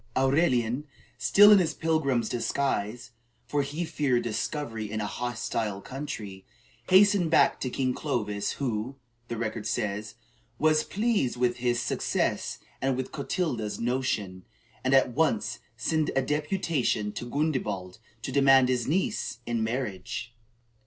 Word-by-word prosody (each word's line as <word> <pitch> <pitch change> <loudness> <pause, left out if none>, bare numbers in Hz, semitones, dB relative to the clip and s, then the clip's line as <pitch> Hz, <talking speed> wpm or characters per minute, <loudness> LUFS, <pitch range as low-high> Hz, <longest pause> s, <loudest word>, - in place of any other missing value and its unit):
Aurelian, 135 -1 +2 0.3
still 195 - +7
in 205 - +8
his 165 -4 0
pilgrim's 140 -8 +1
disguise, 120 -1 -2 0.3
for 145 - 0
he 145 +5 -3
feared 130 -6 0
discovery 115 0 -3
in 110 +1 -3
a 105 - -1
hostile 115 -3 -3
country, 105 -7 -7 0.5
hastened 190 -2 +5
back 160 - +4
to 130 - -2
King 130 0 0
Clovis, 105 -9 -2
who, 125 -1 -3 0.3
the 115 - -4
record 110 -1 -3
says, 105 0 -2 0.4
was 155 0 +3
"pleased 210 - 0
with 120 -1 +1
his 120 -1 0
success - - -1 0.2
and 135 -1 +1
with 130 - -4
Clotilda's 140 - -2
notion, 115 -7 -1 0.4
and 130 +1 +3
at 130 -2 +4
once 120 -6 0 0.2
sent 155 +6 0
a 135 - +2
deputation 150 - 0
to 120 +3 -6
Gundebald 105 - -2 0.2
to 130 - -3
demand 135 -1 +5
his 125 -2 0
niece 190 - -1
in 115 -1 -1
marriage." 110 -1 -4
125 Hz, 130 wpm, -28 LUFS, 110-150 Hz, 0.5 s, in